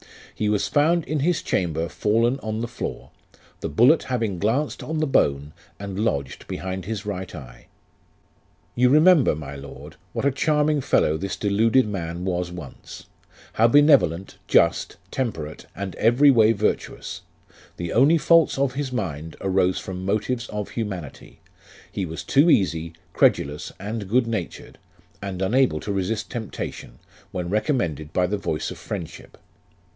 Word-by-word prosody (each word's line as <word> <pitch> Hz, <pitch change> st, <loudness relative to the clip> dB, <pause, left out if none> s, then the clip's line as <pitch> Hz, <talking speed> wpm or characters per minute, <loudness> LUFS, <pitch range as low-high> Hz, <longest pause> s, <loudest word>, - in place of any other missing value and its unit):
He 105 Hz, -, -1 dB
was 105 Hz, -1 st, +1 dB
found 165 Hz, +3 st, +2 dB
in 155 Hz, 0 st, -2 dB
his 170 Hz, +4 st, +1 dB
chamber 85 Hz, -2 st, -1 dB
fallen 115 Hz, +8 st, +1 dB
on 110 Hz, -2 st, -4 dB
the 120 Hz, -, -2 dB
floor, 115 Hz, -, -6 dB, 0.5 s
the -, -, -4 dB
bullet 125 Hz, -, +5 dB
having 115 Hz, -8 st, -2 dB
glanced 125 Hz, -, 0 dB
on 160 Hz, +1 st, -4 dB
the 155 Hz, -, +1 dB
bone, 75 Hz, -, +1 dB, 0.3 s
and 100 Hz, -1 st, -5 dB
lodged 70 Hz, -, -2 dB
behind 95 Hz, 0 st, -5 dB
his 110 Hz, -1 st, -4 dB
right 95 Hz, -3 st, -5 dB
eye. 65 Hz, -6 st, -12 dB, 0.5 s
" -, -, -38 dB
You 125 Hz, +1 st, +4 dB
remember, 155 Hz, -, +5 dB
my 70 Hz, -2 st, -7 dB
Lord, 70 Hz, 0 st, -11 dB, 0.2 s
what -, -, -2 dB
a 140 Hz, -, +4 dB
charming 150 Hz, +2 st, +1 dB
fellow 80 Hz, -10 st, +2 dB
this 95 Hz, +3 st, -4 dB
deluded 110 Hz, +4 st, +2 dB
man 85 Hz, -3 st, -4 dB
was 90 Hz, -1 st, -2 dB
once. 85 Hz, -7 st, -10 dB, 0.5 s
How 115 Hz, -, +4 dB
benevolent, 125 Hz, -, +4 dB
just, -, -, +2 dB
temperate, 80 Hz, -, -4 dB
and 95 Hz, -1 st, -5 dB
every 125 Hz, +6 st, +5 dB
way 115 Hz, -3 st, +5 dB
virtuous; 105 Hz, 0 st, -2 dB, 0.6 s
the 85 Hz, -1 st, -4 dB
only 140 Hz, +8 st, +5 dB
faults 165 Hz, -1 st, +4 dB
of 135 Hz, -2 st, +1 dB
his 135 Hz, -1 st, -3 dB
mind 80 Hz, -, -4 dB
arose 95 Hz, -1 st, +1 dB
from 95 Hz, -1 st, -6 dB
motives 110 Hz, +5 st, -1 dB
of 105 Hz, -1 st, -4 dB
humanity: 95 Hz, -, -6 dB, 0.5 s
he 95 Hz, -, -3 dB
was 80 Hz, +1 st, -6 dB
too 145 Hz, +5 st, +4 dB
easy, 85 Hz, -, +2 dB, 0.2 s
credulous, 75 Hz, +1 st, +1 dB
and 105 Hz, 0 st, -5 dB
good 120 Hz, +3 st, +3 dB
natured, 115 Hz, -1 st, -5 dB, 0.4 s
and 95 Hz, -2 st, -4 dB
unable 120 Hz, -4 st, +2 dB
to 100 Hz, -, -3 dB
resist 100 Hz, +3 st, -2 dB
temptation, 110 Hz, -4 st, -6 dB, 0.3 s
when 90 Hz, -1 st, -4 dB
recom 110 Hz, +8 st, +1 dB
mended 75 Hz, -, -3 dB
by 90 Hz, -, +2 dB
the 100 Hz, +3 st, -2 dB
voice 80 Hz, -5 st, -3 dB
of -, -, -9 dB
friendship. -, -, -7 dB
105 Hz, 155 wpm, -23 LUFS, 90-130 Hz, 0.6 s, bullet